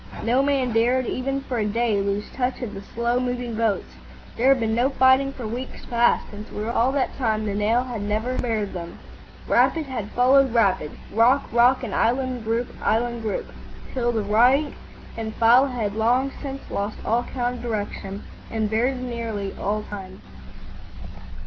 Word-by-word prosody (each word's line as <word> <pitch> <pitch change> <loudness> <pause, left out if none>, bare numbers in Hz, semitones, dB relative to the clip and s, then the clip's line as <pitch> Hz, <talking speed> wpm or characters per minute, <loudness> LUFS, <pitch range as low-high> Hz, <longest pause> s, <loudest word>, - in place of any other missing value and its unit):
No 245 +4 +3
man 275 -3 +1
dared 245 +3 +2
even 270 +3 -2
for 255 -3 -3
a 210 - +1
day 220 -1 +1
lose 200 +1 -1
touch 255 0 -2
of 220 - -5
the 195 - -7
slow 235 +4 -1
moving 245 -1 -2
boats; 220 -3 0 0.5
there 245 - +1
had 270 -1 +5
been 225 -1 0
no 240 +4 +2
fighting 265 0 +4
for 255 -4 -8
weeks 245 +4 -6
past, 240 0 +2
and 210 +2 -8
throughout 215 +3 -4
all 245 +3 +3
that 275 -2 0
time 220 -4 0
the 205 - -2
Nile 215 +4 +2
had 245 -4 -5
never 215 +5 -1
spared 220 -5 -1
them. 170 -2 -7 0.5
Rapid 320 -2 +3
had 245 -6 -5
followed 260 0 +4
rapid, 195 -9 +2 0.2
rock 240 +6 +4
rock, 245 +3 +4
and 220 - -4
island 255 0 0
group 230 +2 -1
island 235 +1 0
group, 215 -2 -3 0.4
till 240 -2 +1
the 220 -3 -1
rank 245 +8 +3 0.4
and 220 -1 -5
file 240 +4 +5
had 230 -6 -2
long 245 +5 +2
since 275 -1 -7
lost 205 +2 -2
all 230 +2 +2
count 245 0 -3
of - - -9
direction 205 -3 -4 0.3
and 220 -2 -1
very 245 +5 +1
nearly 230 -5 -4
of 210 +1 -1
time. 190 -2 -8
235 Hz, 175 wpm, -24 LUFS, 215-255 Hz, 0.5 s, had